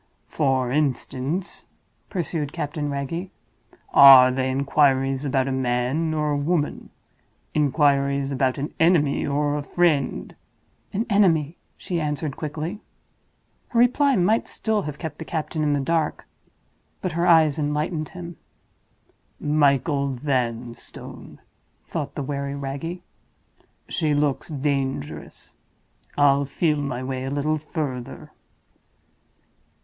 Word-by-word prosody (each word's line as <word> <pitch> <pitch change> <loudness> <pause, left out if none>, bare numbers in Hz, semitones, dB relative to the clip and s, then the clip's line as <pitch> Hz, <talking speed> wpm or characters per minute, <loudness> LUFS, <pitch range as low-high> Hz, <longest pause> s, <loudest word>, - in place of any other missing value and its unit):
"For 130 -4 0
instance," 145 +4 -2 0.4
pursued 165 -5 -3
Captain 145 0 -3
Wragge, 145 +6 -4 0.6
"are 130 -2 +10
they 130 0 -1
inquiries 135 0 +2
about 135 -1 +1
a - - -1
man 130 +5 0
or 150 -1 0
a 145 - +1
woman; 150 +1 -1 0.6
inquiries 140 -1 +2
about 130 -1 0
an 145 +2 -4
enemy 160 -5 +3
or 145 +1 0
a 150 - -2
friend—?" 145 - 0 0.6
"An 215 +4 -1
enemy," 175 - +3 0.2
she 175 -2 -3
answered, 150 -1 -2
quickly. 160 +6 -5 0.9
Her 235 - 0
reply 270 +3 +4
might 210 +4 +2
still 220 -2 -1
have 150 -5 -6
kept 160 -3 -6
the - - -4
captain 160 0 -3
in 150 -1 +2
the 145 - +1
dark—but 165 +3 -5
her 170 +2 0
eyes 160 -3 +5
enlightened 150 +2 -1
him. 175 -2 -9 1.0
"Michael 140 -1 +2
Vanstone!" 120 -3 -4 0.5
thought 145 -4 -5
the 145 - -3
wary 140 0 -3
Wragge. 140 +6 -5 0.9
"She 155 -4 0
looks 145 -2 0
dangerous; 135 - -3 0.6
I'll 140 -1 +4
feel 150 +2 0
my 130 -3 -3
way 130 0 -3
a 135 - -3
little 150 +2 0
further." 145 -5 -5
145 Hz, 115 wpm, -24 LUFS, 135-160 Hz, 1.0 s, are